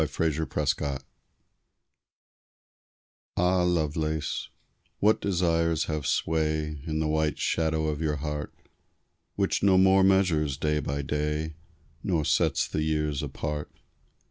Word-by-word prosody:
TO 80 +1 -2
RICHARD 80 0 -1
LOVELACE 70 -2 0 2.3
Ah, 90 +1 +3
Lovelace, 80 -3 -1 0.5
what 105 +2 +3
desires 85 -4 +1
have 75 -3 -3
sway 75 -2 0
In 80 0 -1
the 80 - 0
white 75 0 0
shadow 80 -1 0
of 75 0 -2
your 75 -2 0
heart, 75 0 -4 0.8
Which 100 -1 0
no 95 -2 +5
more 95 +1 +5
measures 85 -8 +3
day 75 +1 0
by 70 0 -3
day, 75 +2 -2 0.5
Nor 80 -5 0
sets - - +2
the 75 - -2
years 75 -2 0
apart? 75 0 -4
80 Hz, 115 wpm, -27 LUFS, 75-85 Hz, 2.3 s, no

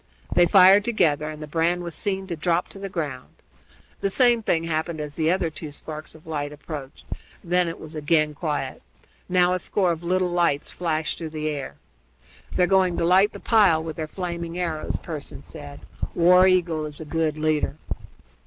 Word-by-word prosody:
They 175 - +5
fired 195 +2 +7
together, 155 -10 +1
and 155 0 -7
the - - -7
brand 170 +3 0
was 170 -1 -5
seen 195 +3 -2
to 175 -3 -4
drop 170 +2 0
to 195 - -9
the 195 0 -5
ground. 145 -8 -5 0.7
The 195 - 0
same 240 +2 +4
thing 165 -6 +1
happened 160 0 -2
as 150 -1 -5
the 160 -1 +1
other 175 -3 0
two 155 0 -7
sparks 155 +2 -8
of 160 - -16
light 145 -2 -3
approached; 150 -2 -8 0.4
then 180 0 +2
it 165 - -5
was 160 +1 -10
again 155 0 +1
quiet. 145 -4 -3 0.5
Now 180 0 +4
a 185 - 0
score 185 0 +1
of 165 -1 -3
little 180 +1 0
lights 170 -5 +1
flashed 160 -3 -1
through 165 -2 -5
the 155 0 -3
air. 145 -3 -5 0.8
"They're 180 - +4
going 185 -2 +3
to - - +1
light 190 +4 +5
the - - -8
pile 195 -9 +4
with 160 -1 -5
their 155 -1 -4
flaming 170 -1 -5
arrows," 165 -4 -2
Pearson 150 -4 -7
said. 145 -3 -8 0.3
"War 180 +2 +6
Eagle 170 -4 +2
is 150 -1 -8
a 160 - -7
good 155 -1 -1
leader." 155 -2 0
165 Hz, 190 wpm, -24 LUFS, 155-180 Hz, 0.8 s, fired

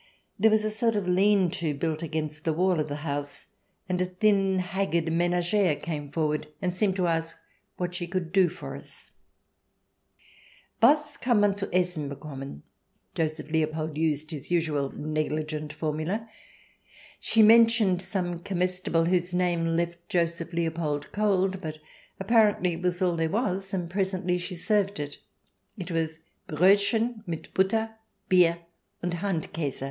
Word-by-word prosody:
There 220 +3 +6
was 215 0 +2
a 215 - 0
sort 225 +1 +1
of 200 -3 -1
lean 190 0 +3
to 170 -5 -2
built 155 +2 -2
against 155 -1 -4
the 160 - +1
wall 180 +1 +2
of 155 0 -1
the 145 - -3
house, 145 -1 -4 0.4
and 180 0 -1
a - - +2
thin, 195 +1 +2
haggard 180 -3 0
menagere 175 +1 +2
came 145 -4 -5
forward 150 -1 -1
and 180 -1 -2
seemed 190 0 +1
to 185 -2 +1
ask 165 -1 -1 0.4
what 180 -1 -3
she 175 -1 -3
could 175 -2 -3
do 190 -3 +5
for 180 - -8
us. - - -13 1.7
"Was 295 +4 +4
kann 240 -4 +2
mann 205 -1 +3
zu 200 -1 -2
essen 180 -5 0
bekommen?" 135 - -8 0.2
— - - -46
Joseph 155 -1 -2
Leopold 155 -1 -1
used 155 0 0
his 150 -4 -7
usual 155 -5 0
negligent 155 0 -3
formula. 155 +8 -3 0.9
She 225 - +4
mentioned 225 -4 +5
some 180 -3 -3
comestible 180 -2 0
whose 180 0 +1
name 170 -2 +1
left 170 0 -3
Joseph 170 -1 -1
Leopold 160 -4 -2
cold, 195 -2 +1
but 155 -3 -5 0.4
apparently 205 -3 +3
it 165 - -6
was 180 0 0
all 175 -2 +2
there 165 -1 0
was, 195 -2 -1
and 180 -4 -2
presently 185 -1 -1
she 180 +1 -5
served 200 +1 +1
it. 145 -1 -5 0.6
It 180 -2 -6
was 160 -1 -2
" - - -46
Brodchen 205 +7 +3
mit 165 -2 -6
Butter, 220 +4 +1 0.3
Bier, 170 -2 +4 0.4
und 175 0 -1
Handkase." 165 -5 -2
175 Hz, 150 wpm, -27 LUFS, 160-195 Hz, 1.7 s, There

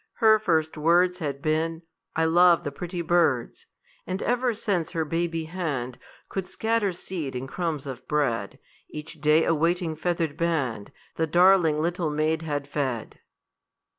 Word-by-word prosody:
Her 220 -1 +5
first 160 -6 0
words 175 +3 +3
Had 140 -4 -4
been, 160 +2 0 0.3
"I 160 - +2
love 175 +1 +5
the 145 - -3
pretty 175 +4 -5
birds;" 160 -8 +1 0.4
And 185 +1 -2
ever 245 -1 +1
since 195 -7 -1
her 165 -3 -2
baby 165 +1 -1
hand 155 -8 -4 0.3
Could 190 -2 -4
scatter 220 -3 0
seed 170 -6 -5
and 125 +2 -4
crumbs 160 -2 -3
of 130 -2 -8
bread, 120 -9 -1 0.3
Each 155 0 -9
day 155 +1 +4
a - - +3
waiting 165 +1 0
feathered 165 -2 -2
band 140 - -1 0.3
The 160 - +1
darling 175 -2 +4
little 170 -1 -1
maid 155 +2 0
had 145 -3 -3
fed. 135 -6 -3
160 Hz, 150 wpm, -26 LUFS, 150-175 Hz, 0.4 s, Her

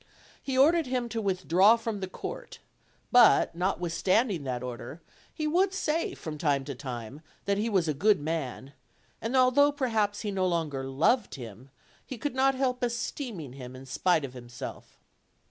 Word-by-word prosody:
He 265 -1 -3
ordered 315 +3 +4
him 250 -2 -1
to 230 -1 -3
withdraw 190 +1 +4
from 225 -2 -4
the 190 - -4
court; 185 - -7 0.5
but, 245 -2 +6
notwithstanding 180 - 0
that 125 -1 -3
order, 125 +4 -7 0.3
he 310 - -4
would 370 +5 +2
say 325 -3 -1
from 155 -2 -7
time 140 -3 +1
to 140 - -4
time 130 0 -7 0.2
that 200 0 +1
he 225 +2 0
was 190 -6 +1
a 155 - +1
good 205 +9 +3
man; 145 -3 -4 0.5
and 230 +4 -2
although 260 +3 +5
perhaps 225 -7 0
he 210 - -3
no 190 -1 0
longer 160 -6 -1
loved 160 - +1
him, 120 0 -10 0.3
he 260 - -7
could 290 +4 -3
not 265 +1 +3
help 255 -1 -1
esteeming 235 - -3
him 130 -1 -9
in 130 +1 -10
spite 155 +3 +1
of 130 -1 -10
him 120 -1 -10
self. 120 - -9
190 Hz, 170 wpm, -28 LUFS, -, 0.5 s, but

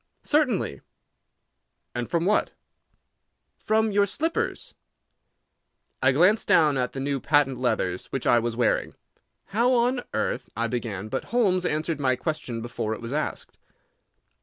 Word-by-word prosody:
"Certainly." 255 - +1 1.1
"And 120 -1 -4
from 170 0 0
what?" 210 +2 +1 1.1
"From 220 0 +1
your 200 0 +3
slippers." 320 - -2 1.3
I 130 0 +5
glanced 180 +11 +3
down 150 -3 +4
at 125 -1 -1
the 135 - -5
new 140 0 -1
patent 140 -2 +2
leathers 95 -8 -1
which 135 - -4
I 120 - +5
was 115 0 -2
wearing. 120 -1 0 0.5
"How 235 +6 +2
on 245 +1 +2
earth—" - - -2
I 115 - +1
began, 110 -4 -3
but - - -3
Holmes 190 -7 +1
answered 155 0 -1
my 130 -2 +2
question 125 -7 -4
before 110 -2 -3
it - - -10
was 115 +3 -5
asked. 155 - -4
145 Hz, 135 wpm, -25 LUFS, -, 1.3 s, I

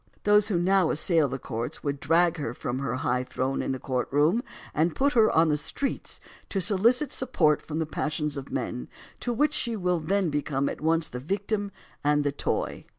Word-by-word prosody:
Those 210 0 +5
who 200 -5 0
now 185 0 +3
assail 160 -1 +2
the 135 0 -4
courts 115 -3 -5
would 140 -1 -2
drag 170 +4 +3
her 125 -6 -4
from 125 +1 -3
her 140 -1 -2
high 125 0 0
throne 130 +1 -2
in - - -2
the 130 - -2
courtroom 145 - +1 0.3
and 160 +2 +1
put 280 +2 +2
her 225 -3 +5
on 160 0 +4
the 150 - +2
streets 270 - -3 0.3
to 195 - -1
solicit 230 - +2
support 165 - +2
from 155 - -5
the 160 - 0
passions 150 0 -2
of 140 -2 -7
men, 60 - -3 0.3
to 245 - -2
which 295 +6 +2
she 235 -6 0
wHl 180 -4 0
then 190 0 +1
become 140 -1 -1
at - - -7
once 160 0 +2
the 125 - -6
victim 200 - -2 0.3
and 145 0 +3
the 145 - +1
toy. 140 - -2
160 Hz, 200 wpm, -27 LUFS, 140-200 Hz, 0.3 s, Those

